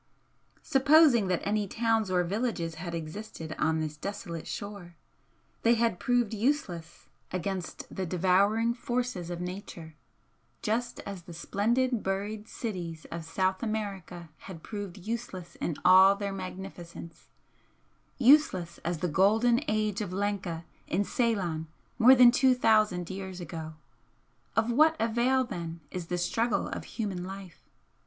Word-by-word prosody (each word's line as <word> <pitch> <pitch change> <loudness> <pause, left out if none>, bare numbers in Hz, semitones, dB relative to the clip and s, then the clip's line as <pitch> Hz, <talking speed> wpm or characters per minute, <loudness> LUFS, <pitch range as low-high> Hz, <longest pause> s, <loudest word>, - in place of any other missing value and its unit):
Supposing 275 -5 +5
that 180 -2 0
any 210 0 0
towns 225 -1 +1
or 180 -1 +2
villages 195 -3 -2
had 165 +3 -7
ever - - 0
existed 160 -1 -7
on 160 +1 +2
this 155 -1 -3
desolate 185 -2 -6
shore, 200 -4 -7 0.7
they 235 +1 +4
had 230 -5 +1
proved 245 -3 +1
useless 205 - -2 0.3
against 185 -1 -4
the 190 -1 -2
devouring 195 +6 +3
forces 240 -7 -3
of 175 -1 -4
Nature, 180 -3 -7 0.7
just 235 +3 -1
as 200 -3 -7
the 170 0 -11
splendid 235 +7 0
buried 205 +3 -3
cities 175 -10 -5
of 165 0 -5
South 185 +3 0
America 195 -6 -4 0.2
had 165 -4 -9
proved 205 -4 -6
useless 195 -3 -5
in 165 - -2
all 190 +2 +8
their 200 -1 -3
magnificence, 185 -3 -8 0.9
useless 245 - +4
as 170 +1 -2
the 180 - +1
'Golden 220 - +3
Age 215 -3 0
of 205 - -4
Lanka' 190 -4 -2 0.2
in 195 +4 +1
Ceylon 190 -9 -1 0.3
more 255 +3 +8
than 245 -1 +8
two 255 +1 +4
thousand 215 -7 +2
years 190 -1 -6
ago. 160 -2 -7 0.8
Of 225 +2 +2
what 310 +6 +5
avail 240 +4 +2
then 170 -8 -6
is 180 -2 -5
the 180 - -2
struggle 225 +6 0
of - - -5
human 195 -5 -4
life? 190 -2 -10
195 Hz, 135 wpm, -29 LUFS, 175-225 Hz, 0.9 s, all